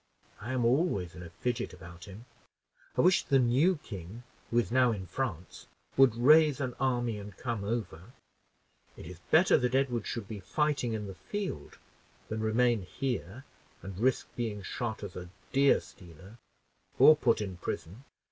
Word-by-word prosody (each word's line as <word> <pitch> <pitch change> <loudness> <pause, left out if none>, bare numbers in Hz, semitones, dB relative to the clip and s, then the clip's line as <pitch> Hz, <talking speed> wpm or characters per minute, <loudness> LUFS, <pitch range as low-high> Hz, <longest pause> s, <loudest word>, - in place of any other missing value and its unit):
I 110 +4 -6
am 125 -2 +1
always 120 - +1
in - - -10
a 85 - -9
fidget 120 +8 -3
about 85 0 -12
him. 100 +4 -11 0.7
I - - +5
wish 180 +1 +5
the 135 - +2
new 135 +9 +3
king, 100 +3 -8 0.3
who 120 - 0
is 120 - +1
now 125 -1 +4
in 100 -4 -4
France 90 - -5 0.3
would 135 -4 +5
raise 150 +4 +5
an 130 -3 -2
army 120 -4 0
and 100 -1 -10
come 120 -5 -3
over. 100 -3 -4 0.9
It - - -10
is 85 0 -10
better 175 +4 +5
that 125 0 0
Edward 125 -5 0
should 115 -4 -4
be 105 -1 -6
fighting 130 - -1
in 105 -1 -3
the 95 - -7
field 95 - -6 0.5
than 110 0 -3
remain 115 +1 +2
here 120 +3 -4 0.4
and 95 -1 -8
risk 130 +2 +1
being 110 -4 -3
shot 110 +3 -4
as 100 -3 -7
a 90 -1 -7 0.2
deer 140 +1 +5
stealer, 90 +6 -15 0.6
or 155 - +8
put 125 -6 +2
in 95 -4 -5
prison. 90 +6 -6
115 Hz, 165 wpm, -30 LUFS, 95-130 Hz, 0.9 s, or